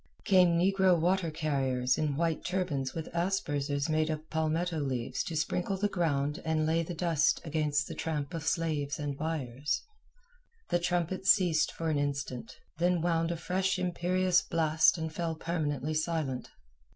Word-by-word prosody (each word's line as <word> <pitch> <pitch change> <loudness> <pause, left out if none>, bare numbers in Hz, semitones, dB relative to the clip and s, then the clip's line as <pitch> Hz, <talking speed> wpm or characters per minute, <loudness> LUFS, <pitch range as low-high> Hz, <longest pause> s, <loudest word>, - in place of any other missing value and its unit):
Came 180 -3 +5
negro 190 0 +3
water 175 +1 +1
carriers 135 -5 0
in 150 -2 -1
white 165 +1 0
turbans 160 -8 -2
with 160 -1 -4
aspersers 145 -5 -1
made 155 0 +1
of 155 0 -4
palmetto 160 +1 0
leaves 130 -4 -2
to 165 - -4
sprinkle 180 +5 -1
the 205 +2 +1
ground 155 -4 -1
and 160 -1 +1
lay 160 +1 +2
the 170 +1 -5
dust 165 -2 +2
against 150 -2 0
the - - -6
tramp 150 -3 -3
of 165 - -3
slaves 155 -4 -1
and 145 -1 -3
buyers. 145 -3 -2 0.9
The 175 - +2
trumpets 175 +2 -1
ceased 175 -6 +4
for 165 -1 -2
an 145 - +1
instant, 140 -4 -3 0.2
then 175 0 +2
wound 165 -1 +1
a 170 - -2
fresh 185 +3 0
imperious 180 0 +2
blast 160 0 +3
and 160 -1 -4
fell 165 -1 -2
permanently 155 -3 -2
silent. 155 -5 -2
160 Hz, 155 wpm, -30 LUFS, 145-175 Hz, 0.9 s, Came